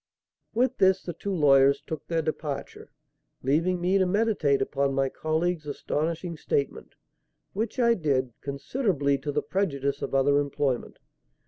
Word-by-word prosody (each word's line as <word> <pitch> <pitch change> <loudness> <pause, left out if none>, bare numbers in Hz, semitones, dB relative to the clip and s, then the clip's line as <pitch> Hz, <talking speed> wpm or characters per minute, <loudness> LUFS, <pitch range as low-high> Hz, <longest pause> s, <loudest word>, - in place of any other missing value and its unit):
With 255 +2 +1
this 190 0 +4
the 175 - -5
two 200 - -5
lawyers 140 -5 +5
took 155 +1 -7
their 165 -1 0
departure, 150 -2 -5 0.5
leaving 165 +7 +1
me 185 +3 +2
to 185 - +3
meditate 195 -8 +2
upon 140 -1 0
my 135 0 +1
colleague's 160 +2 -1
astonishing 165 +4 -3
statement; 140 -2 -2 0.6
which 220 +6 -3
I 235 -2 +4
did, 135 - 0
considerably 140 - -1
to 145 +2 -3
the 150 +1 -1
prejudice 140 -8 -1
of - - -3
other 140 +1 +4
employment. 140 -3 -2
155 Hz, 140 wpm, -27 LUFS, 140-185 Hz, 0.6 s, lawyers